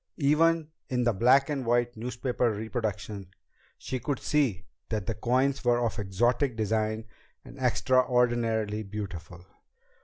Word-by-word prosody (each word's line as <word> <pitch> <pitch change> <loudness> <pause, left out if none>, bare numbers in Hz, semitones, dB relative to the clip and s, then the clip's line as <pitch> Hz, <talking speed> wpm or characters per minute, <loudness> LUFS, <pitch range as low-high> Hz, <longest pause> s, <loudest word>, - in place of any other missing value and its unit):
Even 160 +2 +3 0.2
in 125 -2 0
the 120 -1 +2
black 130 +7 +4
and 145 -3 -2
white 120 0 +1
newspaper 120 +1 -1
reproduction, 105 -2 -4 0.5
she 130 - -4
could 135 +3 -2
see 125 - 0 0.2
that 105 -4 -2
the 115 - -1
coins 130 +5 +1
were 120 -1 +3
of 115 0 -2
exotic 120 +6 +1
design 110 0 -1 0.4
and 135 - -12
extraordinarily 120 -4 +2
beautiful. 95 -4 -7
120 Hz, 125 wpm, -28 LUFS, 110-130 Hz, 0.5 s, black